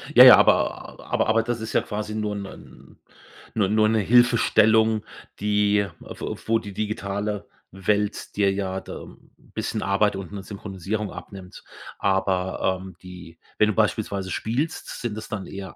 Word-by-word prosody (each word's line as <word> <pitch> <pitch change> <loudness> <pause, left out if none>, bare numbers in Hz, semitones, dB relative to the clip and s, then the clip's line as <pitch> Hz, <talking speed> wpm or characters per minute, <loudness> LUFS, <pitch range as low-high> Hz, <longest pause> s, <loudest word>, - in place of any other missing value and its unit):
Ja, - - +11
ja, - - +12
aber - - +1
aber - - +1
aber 115 +1 +3
das 120 0 -2
ist 110 - -5
ja - - +3
quasi 105 0 -5
nur 105 -1 -2
'nen 100 -1 -11 0.6
nur 105 -3 +2
nur 110 +1 +3
'ne 110 0 +2
Hilfestellung, 110 -1 +4 0.4
die 105 0 +2
w - - -6
wo 115 0 +3
die 100 -2 -9
digitale 105 0 -3 0.2
Welt 100 +2 -1
dir 100 -1 +3
ja 95 -1 -2
da - - -8
'n - - -16
bisschen 110 - -5
Arbeit 100 +1 +1
und 95 -1 -7
'ne 100 -2 -7
Synchronisierung 100 +1 -5
abnimmt. 95 -2 -10 0.4
Aber, 95 -1 0
ähm, 95 -1 -10
die 90 -2 -12 0.2
wenn 105 0 +4
du - - 0
beispielsweise 100 -3 0
spielst, 130 - -3
sind 115 -3 -3
das 110 - -8
dann 100 -4 -5
eher 95 -1 -8
105 Hz, 160 wpm, -24 LUFS, 95-110 Hz, 0.6 s, ja